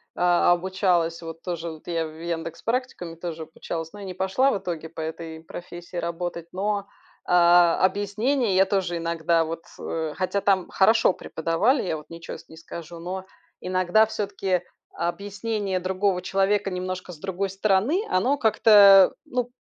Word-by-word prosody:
а, 175 0 +3
обучалась 175 -2 +1
вот 165 0 -8
тоже 170 -2 -4
вот 160 +1 -13
я 165 -1 -1
в 155 +1 -12
"Яндекс 165 -1 -4
Практикуме", 230 -8 -3
тоже 165 -1 -6
обучалась. 165 +1 -6
Но 205 - -10
я 200 - -7
не 185 - -5
пошла 190 +9 +2
в - - 0
итоге 165 -4 -5
по 160 - -11
этой 160 0 -6
профессии 175 +1 -10
работать. 170 0 -4
Но, 205 +2 -1 0.5
а 175 -1 +5
а - - +5
объяснение 205 +4 0
я 190 +1 +5
тоже 190 -3 -1
иногда, 165 0 +1
вот, 165 +1 -6 0.2
э, 160 -2 -3
хотя 185 +2 0
там 195 -2 +2
хорошо 220 +1 +4
преподавали, 180 - 0
я 165 -4 -2
вот 150 - -13
ничего 165 0 -8
с - - -17
не 160 - -12
скажу, 165 +1 -9
но 185 +2 -5 0.4
иногда, 185 +3 +3
всё-таки, 195 -4 -2 0.3
объяснение 200 +2 -2
другого 185 0 0
человека 195 +2 +1
немножко 185 0 -4
с 165 - -10
другой 195 +2 -3
стороны- 200 - +1
оно 250 +10 +2
как-то, 205 -4 +7
ну, 245 -1 -2
180 Hz, 160 wpm, -25 LUFS, 170-200 Hz, 0.5 s, как-то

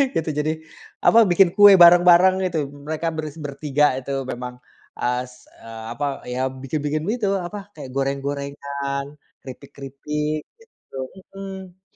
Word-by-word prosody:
gitu. 160 -1 -1
Jadi, 155 +1 0 0.5
apa, 230 - +7
bikin 180 0 +4
kue 205 -1 +9
bareng-bareng 175 +2 +7
gitu, 170 -3 -1 0.3
mereka 160 +2 -3
bers 155 -1 -5
bertiga 145 -1 0
itu, 135 +1 -6 0.2
memang 125 0 -6 0.5
as 125 0 -3 0.2
a 115 0 -8
apa, 145 - -1 0.2
iya, 125 +1 -3 0.2
bikin-bikin 150 +2 -2
itu, 225 -3 -1 0.2
apa, 205 +4 -6 0.2
kayak, 145 -4 -9
apa, 130 - -13
goreng-gorengan, 140 0 -3 0.4
keripik-keripik 140 +3 -5 0.2
gitu, 455 - -16 0.4
mhm. 190 -1 -9
150 Hz, 125 wpm, -22 LUFS, 135-175 Hz, 0.5 s, kue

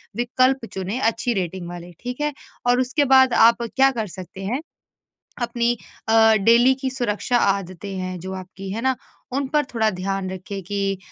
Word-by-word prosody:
विकल्प 255 +2 +1
चुनें 190 +5 -3
अच्छी 240 0 +1
रेटिंग 185 -2 -3
वाले 175 0 -8
ठीक 250 +3 -5
है? 295 0 0 0.3
और 245 0 +4
उसके 275 +3 +1
बाद 265 -1 +6
आप 230 +1 +5
क्या 270 0 +5
कर 225 -4 -3
सकते 185 +1 -9
हैं। 245 +8 -1 0.8
अपनी 240 0 0 0.3
अ, 225 0 +6
डेली 235 +5 +5
की 265 -1 -1
सुरक्षा 245 -1 -1
आदतें 195 -1 -1
हैं 185 0 -4
जो 190 +2 -6
आपकी 190 +1 -8
है 220 - -3
ना? 260 0 +2 0.4
उन 275 +1 0
पर 295 +1 +2
थोड़ा 220 -1 +2
ध्यान 190 0 -3
रखिए 190 +1 -6
कि 195 +1 -2
225 Hz, 175 wpm, -22 LUFS, 190-250 Hz, 0.8 s, बाद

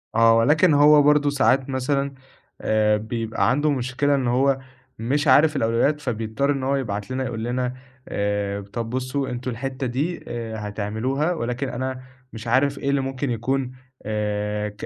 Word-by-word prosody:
آه، 115 0 +6
ولكن 150 +8 +4
هو 145 +1 +7
برضه 145 0 +4
ساعات 135 -1 +2
مثلًا 140 +1 -1 0.5
آآ 105 -1 +2
بيبقى 115 +1 -1
عنده 145 +3 +2
مشكلة 135 +2 0
إن 130 -3 0
هو 135 +2 +2 0.4
مش 145 +6 0
عارف 150 +2 +5
الأولويات 130 +4 +1
فبيضطر 115 +2 -1
إن 135 -2 -2
هو 135 +1 +1
يبعت 105 -4 -3
لنا 130 +1 -1
يقول 115 -3 -4
لنا: 125 +1 -1 0.3
"آآ 100 0 -1
طَب 115 +3 -5
بُصّوا 130 +2 -2
أنتم 125 +1 -4
الحتّة 130 +2 -4
دي 145 +9 -2
آآ 115 -2 -5
هتعملوها 110 +10 -1
ولكن 125 -2 -3
أنا 130 +1 -4 0.3
مش 115 +1 -8
عارف 135 +4 +2
إيه 140 - -2
اللي 140 0 +2
ممكن 135 +1 -3
يكون 130 +3 -1 0.3
آآ 105 0 -2
ك 105 0 -9
130 Hz, 160 wpm, -23 LUFS, 115-140 Hz, 0.5 s, هو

